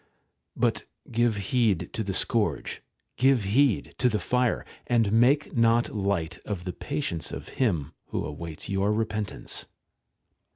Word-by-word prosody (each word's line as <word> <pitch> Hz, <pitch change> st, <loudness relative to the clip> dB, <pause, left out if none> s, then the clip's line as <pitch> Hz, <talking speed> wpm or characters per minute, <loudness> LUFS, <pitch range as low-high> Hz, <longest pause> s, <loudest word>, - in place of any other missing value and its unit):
But -, -, +1 dB, 0.3 s
give 120 Hz, -2 st, +2 dB
heed 100 Hz, -4 st, +1 dB
to 110 Hz, -, -1 dB
the 95 Hz, -2 st, -3 dB
scourge, 115 Hz, 0 st, 0 dB, 0.4 s
give 130 Hz, -3 st, +4 dB
heed 115 Hz, +4 st, +2 dB
to 125 Hz, -, +4 dB
the 110 Hz, -, +1 dB
fire; 125 Hz, 0 st, +1 dB, 0.2 s
and 115 Hz, -4 st, +3 dB
make 130 Hz, +7 st, +3 dB
not\ 115 Hz, 0 st, +3 dB
light 95 Hz, -6 st, -1 dB
of 100 Hz, -4 st, -4 dB
the 90 Hz, -1 st, -4 dB
patience 140 Hz, -, -3 dB
of -, -, -7 dB
Him 85 Hz, -, +1 dB
who -, -, -2 dB
awaits 80 Hz, +1 st, -6 dB
your 100 Hz, +1 st, +1 dB
repentance. 110 Hz, -2 st, -2 dB
110 Hz, 135 wpm, -27 LUFS, 95-120 Hz, 0.4 s, give